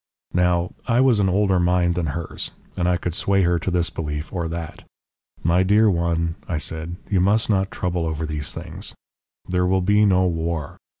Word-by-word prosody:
"Now, 90 0 +2 0.2
I 120 0 +3
was 130 -5 +4
an 95 -2 +3
older 95 -1 +2
mind 90 0 +2
than 85 -2 -1
hers, 80 +3 -3 0.3
and 90 0 +1
I 90 - +2
could 85 0 -3
sway 95 +2 +2
her 85 -1 +2
to 80 - -2
this 85 -1 0
belief 75 0 -4
or 85 -3 -2
that. 80 -1 -6 0.6
"'My 85 +3 +3
dear 105 +3 +4
one,' 85 -1 0
I 85 - -1
said, 80 +2 -4
'you 95 - +1
must 105 +4 +2
not 95 -1 +1
trouble 90 -2 -2
over 80 0 -2
these 75 -1 -3
things. 90 +3 -6 0.5
There 90 0 +1
will 95 +1 +2
be 105 +2 +4
no 95 -1 +4
war. 80 -3 -2
90 Hz, 190 wpm, -22 LUFS, 85-95 Hz, 0.6 s, was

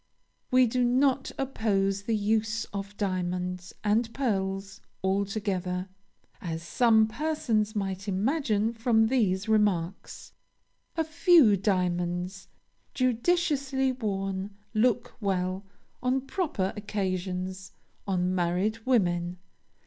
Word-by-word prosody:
We 255 0 +5
do 245 +2 +1
not 260 +2 +2
oppose 200 -7 0
the 220 +2 -1
use 220 +1 0
of 200 +1 -6
diamonds 180 -2 -2
and 225 +3 +2
pearls 195 -6 -2 0.2
altogether, 190 -2 -1 0.5
as 165 -2 -4
some 220 +4 +4
persons 225 -6 -1
might 195 -1 -3
imagine 220 +1 +1
from 225 -1 +3
these 205 -6 +1
remarks. 200 -5 0 0.6
A 325 - +3
few 315 - +5
diamonds, 180 -1 -1 0.5
judiciously 265 +1 +1
worn, 195 -4 -3 0.2
look 240 +2 +1
well, 190 -1 -1 0.3
on 255 +1 +1
proper 270 - -2
occasions, 190 -2 -3 0.4
on 185 -1 +1
married 185 +5 0
women. 175 -7 +1
205 Hz, 95 wpm, -28 LUFS, 185-240 Hz, 0.6 s, We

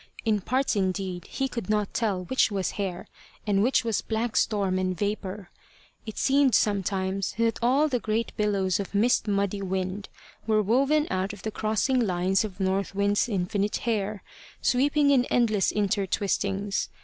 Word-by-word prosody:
In 215 -2 +2
parts 260 +5 0
indeed 185 -2 -2
he 270 - -1
could 235 -6 -6
not 210 -2 0
tell 205 -6 -1
which 260 +7 +2
was 195 -3 -2
hair 190 -3 -4 0.4
and 200 -2 +2
which 250 +5 +3
was 225 -3 0
black 225 +1 -2
storm 195 -4 +1
and 185 -1 -1
vapour. 200 -1 -4 0.6
It 220 - -7
seemed 275 -2 +3
sometimes 195 -1 0
that 230 -1 +1
all 265 +6 +3
the 255 -4 0
great 220 +1 -2
billows 200 -2 +1
of 200 0 -5
mist 225 +1 +2
muddy 200 0 0
wind 190 +1 -3 0.4
were 215 -1 +3
woven 275 +8 +2
out 190 +2 -1
of 210 - -12
the 220 - -3
crossing 220 +5 0
lines 190 -3 +1
of 200 -3 -7
North 195 +1 -1
Wind's 205 +3 +1
infinite 200 +1 -1
hair, 210 -3 -1 0.4
sweeping 285 +3 +2
in 255 -3 +4
endless 220 -7 +2
intertwistings. 200 -1 -1
205 Hz, 160 wpm, -26 LUFS, 195-230 Hz, 0.6 s, in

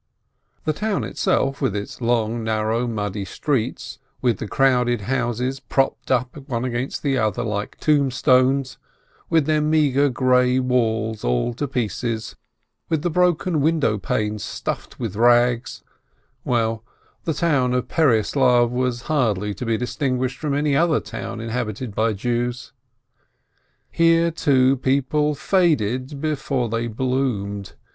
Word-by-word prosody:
The 155 - +1
town 205 - -1
itself, 135 +7 0
with 100 - 0
its 105 +4 -6
long, 115 -1 0
narrow, 110 +2 0
muddy 105 -3 -3
streets, 125 +5 -3 0.2
with 120 -3 +1
the 110 - -4
crowded 125 -2 +2
houses 125 +3 -1
propped 135 0 -1
up 125 -1 0
one 120 0 -1
against 125 +1 -3
the 135 -3 +1
other 110 -4 0
like 105 -2 -3
tombstones, 135 -2 +2 0.5
with 160 -3 +3
their 155 0 +2
meagre 145 -2 +3
grey 125 0 +3
walls 115 -4 0
all - - 0
to 145 +5 -3
pieces, 115 -2 -3 0.5
with 160 -2 0
the 175 - 0
broken 175 -2 +2
window 150 -9 +1
panes 105 +2 -2
stuffed - - -5
with 115 -5 -4
rags 120 +1 +2 0.3
— - - -41 0.2
well, 115 -2 0 0.4
the 160 - 0
town 140 -7 +1
of 125 - -1
Pereyaslav 125 -3 +3
was 125 -1 -1
hardly 105 -9 0
to 125 - -6
be 115 -1 +1
distinguished 125 0 -2
from 145 -2 -1
any 145 -1 +1
other 165 +1 +3
town 110 +1 -6
inhabited 115 -1 -4
by 110 +1 +1
Jews. 120 +3 -3 1.2
Here, 165 0 +3
too, 135 -4 +3
people 140 +3 +1
faded 140 - +1
before 140 -5 -1
they 115 +1 -1
bloomed. 110 -6 -2
125 Hz, 135 wpm, -22 LUFS, 115-140 Hz, 1.2 s, with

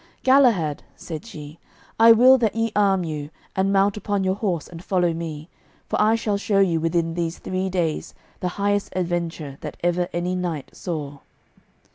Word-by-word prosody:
"Galahad," 235 - +4
said 160 -3 -8
she, 150 +1 -10 0.4
"I 230 +1 +8
will 255 +3 +7
that 220 -3 0
ye 225 0 0
arm 195 -3 +3
you, 150 -3 -5 0.3
and 195 +1 +1
mount 200 +1 +2
upon 205 -2 -1
your 190 0 +1
horse 190 -6 -2
and 170 0 -11
follow 180 -3 +1
me, 160 -2 -6 0.4
for - - 0
I 215 +1 +4
shall 215 -3 -1
show 200 0 0
you 180 -4 +3
within 165 0 0
these 170 0 -2
three 185 +1 -3
days 175 -4 -2 0.2
the 180 - -2
highest 205 0 0
adventure 170 -5 -3
that 150 - -7
ever 175 0 +1
any 175 +1 -2
knight 175 -6 -3
saw." 145 -5 -5
180 Hz, 170 wpm, -23 LUFS, 165-200 Hz, 0.4 s, I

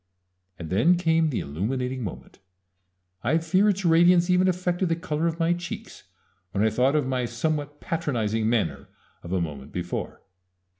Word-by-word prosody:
And 85 -1 -7
then 130 - +4
came 165 -2 +2
the 130 - -2
illuminating 125 - -3
moment 95 - -8 0.8
I 140 +8 +2
fear 185 +5 +2
its 195 -2 -1
radiance 175 +2 +5
even 180 +1 +4
affected 180 0 0
the 165 - +2
color 165 -1 -2
of 165 -1 -2
my 165 +1 +3
cheeks 175 0 -7 0.5
when 100 - +1
I 110 - +3
thought 130 +6 +2
of 150 -3 +2
my 130 -1 -1
somewhat 145 +4 -2
patronizing 115 -9 -1
manner 115 -2 -1 0.3
of 85 - -9
a 95 - +1
moment 75 -5 -5
before. 90 -1 -5
150 Hz, 160 wpm, -25 LUFS, 110-170 Hz, 0.8 s, radiance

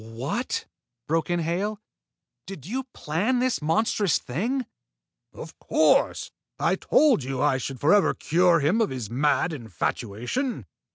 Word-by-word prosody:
"What!" 125 - -3 0.4
broke 165 +2 0
in 175 0 0
Hale. 195 +6 -2 0.7
"Did 175 -9 -9
you 255 +8 -3
plan 215 - -1
this 255 -5 0
monstrous 185 +4 +1
thing?" 235 - -2 0.7
"Of - - -11
course! - - +2 0.3
I - - +1
told 280 - +3
you 130 0 -4
I 140 -2 +2
should 135 0 -5
forever 195 - +4
cure 170 0 +3
him 175 +11 +2
of 220 - +1
his 125 -6 -5
mad 150 +6 +1
infatuation." 120 - -3
165 Hz, 130 wpm, -25 LUFS, 135-220 Hz, 0.7 s, forever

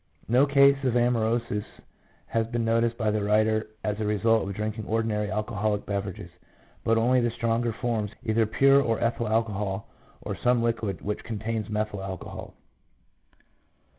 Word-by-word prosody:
No 125 +5 +4
case 140 0 +5
of 125 -3 +1
amaurosis 115 -3 +1 0.6
has 115 -1 -1
been 120 0 -2
noticed 115 +1 +1
by 110 -2 +1
the 105 -1 -1
writer 110 +1 +2 0.2
as 105 0 -2
a - - -1
result 110 +2 +2
of 100 - -5
drinking 105 +1 -4
ordinary 110 -2 0
alcoholic 105 -1 -1
beverages, 100 -2 -4
1 - - -31 0.4
but 115 0 +2
only 125 +3 +3
the 120 - +1
stronger 115 0 0
forms, 115 -2 -2
either 110 0 +2
pure 135 +5 +5
or 115 -4 0
ethyl 115 0 0
alcohol, 105 -3 -1 0.4
or - - -4
some 125 -1 +2
liquid 115 -5 -1
which 105 +1 -3
contains 110 -1 -3
methyl 105 -2 -2
alcohol. 95 -2 -7
110 Hz, 155 wpm, -26 LUFS, 105-115 Hz, 0.6 s, case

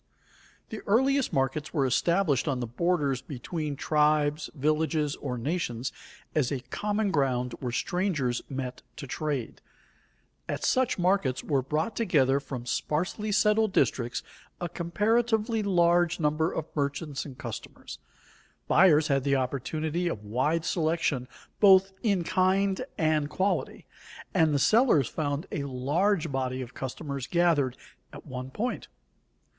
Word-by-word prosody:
_ - - -40
The 220 - -6
earliest 265 +5 +3
markets 135 +4 -1
were 140 -3 +2
established 150 +3 +2
on 135 -3 0
the 120 - -2
borders 140 +1 0
between 150 +2 -4
tribes, 150 +1 +1
villages 155 +1 0
or 125 -3 -4
nations 130 -3 -2 0.4
as 150 -4 +1
a 135 -3 -2
common 210 -1 0
ground 125 -5 0
where 125 -2 -3
strangers 150 -4 -1
met 130 -2 -5
to - - -7
trade. 140 -3 -3 0.9
At - - -3
such 260 -1 +2
markets 180 -8 +1
were 140 -4 +1
brought 155 - -2
together 140 - +2
from 130 -3 -7
sparsely 180 - -2
settled 210 0 +3
districts 120 -1 +1 0.4
a 175 - -2
comparatively 220 +6 +1
large 175 -3 +3
number 155 +1 +1
of 155 - -3
merchants 145 0 -2
and 135 -4 -10
customers. - - -8 0.7
Buyers 160 -4 +5
had 135 -2 +1
the 140 0 +2
opportunity 155 +6 -1
of 105 -11 -4
wide 145 +10 0
selection 160 -7 0 0.3
both 195 -1 +6
in 200 -6 +1
kind 190 +4 +1
and 155 -2 +1
quality, 190 +6 -1 0.5
and 160 -4 +4
the 145 - +2
sellers 215 - +4
found 145 +1 -2
a 140 - -2
large 155 +7 0
body 130 -1 -2
of 125 - -11
customers 140 0 -5
gathered 160 -7 +2 0.3
at - - -11
one 130 +1 -6
point. 235 - -3
155 Hz, 135 wpm, -28 LUFS, 135-185 Hz, 0.9 s, both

